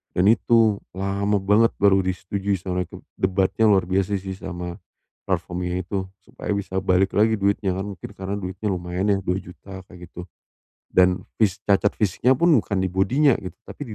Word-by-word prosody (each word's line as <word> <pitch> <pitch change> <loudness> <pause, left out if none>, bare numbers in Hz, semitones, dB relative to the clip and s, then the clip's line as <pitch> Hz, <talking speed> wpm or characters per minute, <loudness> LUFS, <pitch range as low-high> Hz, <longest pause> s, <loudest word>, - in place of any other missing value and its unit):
Dan 95 +3 +4
itu 110 0 +3 0.2
lama 100 +2 -1
banget 105 +4 +3
baru 100 -1 +5
disetujui 95 +2 -2
sama 90 0 -3
mereka. 85 - -12 0.2
Debatnya 95 +3 +1
luar 95 -2 +4
biasa, 95 +2 0
sih, 95 0 -6
sama 90 0 -6 0.5
platform 90 0 -2
ini 90 +1 -2
itu. 95 -1 -3 0.2
Supaya - - -6
bisa 95 -1 -2
balik 95 0 +2
lagi 110 +2 +4
duitnya, 100 -1 0
kan. 95 +2 -3
Mungkin 95 -1 -9
karena 95 +1 -4
duitnya 95 +2 -5
lumayan 90 +3 -2
ya 100 - +3
Rp2.000.000 95 +1 -5
kayak 90 -1 -12
gitu. 90 - -8 0.7
Dan 90 0 +3 0.2
fis 100 -3 +2
cacat 100 0 +2
fisiknya 110 +6 +2
pun, 170 +6 +3
bukan 100 -2 -2
di 95 - 0
body-nya, 120 - +3
gitu. 95 - -7
Tapi 125 -7 -8
95 Hz, 170 wpm, -23 LUFS, 90-100 Hz, 0.7 s, baru